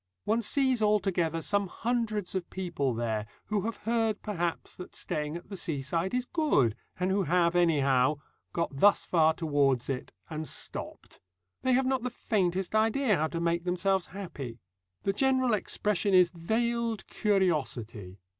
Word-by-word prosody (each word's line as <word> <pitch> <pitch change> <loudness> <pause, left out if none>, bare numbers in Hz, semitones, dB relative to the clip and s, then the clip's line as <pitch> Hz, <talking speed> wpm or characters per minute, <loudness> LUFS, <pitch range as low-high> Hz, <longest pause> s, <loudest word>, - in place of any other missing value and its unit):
One 225 +2 +1
sees 260 +1 +2
altogether 185 -6 +1
some 200 -1 +1
hundreds 220 -2 -2
of 185 -2 -3
people 165 -9 -2
there 110 -2 -2 0.2
who 210 -2 0
have 230 -1 -3
heard 225 -2 +1
perhaps 175 -5 -3
that 180 - -9
staying 150 +2 -3
at 175 - -13
the 200 - -5
seaside 165 - -2
is 250 0 0
good, 245 - +2 0.2
and 185 +1 +1
who 200 +1 +2
have, 175 0 +2
anyhow, 145 -5 +3 0.3
got 165 -4 -2
thus 205 +4 +5
far 160 -2 +3
towards 140 -6 +1
it, 130 - -5 0.2
and 155 -1 -5
stopped. - - -6 0.4
They 260 - +2
have 260 +1 +3
not 260 -1 +1
the 250 - -2
faintest 190 -5 -1
idea 220 +2 +3
how 155 -1 +1
to 165 - -4
make 170 0 0
themselves 180 +1 +1
happy. 145 -11 -7 0.5
The 195 - +1
general 260 +1 +2
expression 205 -1 +1
is 180 -2 +6
veiled 230 +5 -1
curiosity. 130 - -1
185 Hz, 155 wpm, -29 LUFS, 155-215 Hz, 0.5 s, is